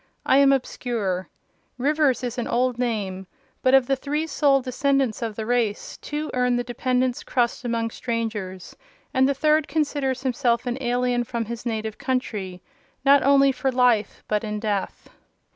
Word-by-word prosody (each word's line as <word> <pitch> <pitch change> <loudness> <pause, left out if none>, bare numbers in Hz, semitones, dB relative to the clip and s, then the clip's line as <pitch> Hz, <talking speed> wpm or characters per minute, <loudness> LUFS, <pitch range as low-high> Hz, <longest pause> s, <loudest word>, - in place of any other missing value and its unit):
I 265 - +4
am 280 0 +6
obscure: 225 -8 -2 0.5
Rivers 285 -1 +2
is 245 0 -3
an 240 - -2
old 245 0 0
name; 200 -6 -2 0.3
but 260 +1 +5
of 265 -2 +5
the 270 - +1
three 295 +4 -2
sole 285 -3 +3
descendants 265 -1 0
of 225 -2 -3
the 220 - -4
race, 235 -3 -1
two 300 +1 -5
earn 250 -1 +2
the 245 - 0
dependent's 250 +1 -1
crust 245 0 -1
among 230 -1 -1
strangers, 220 -7 -4 0.4
and 260 +1 +3
the 280 - +1
third 305 +1 +2
considers 280 -4 -1
himself 245 -2 +1
an 250 +2 -3
alien 245 0 +1
from 235 -1 -3
his 235 +2 -6
native 220 -1 -3
country—not 250 +3 -1
only 275 0 +5
for 265 +1 -1
life, 245 -5 +2
but 210 0 0
in 210 -1 -3
death. 205 -2 -3
245 Hz, 160 wpm, -24 LUFS, 230-270 Hz, 0.5 s, am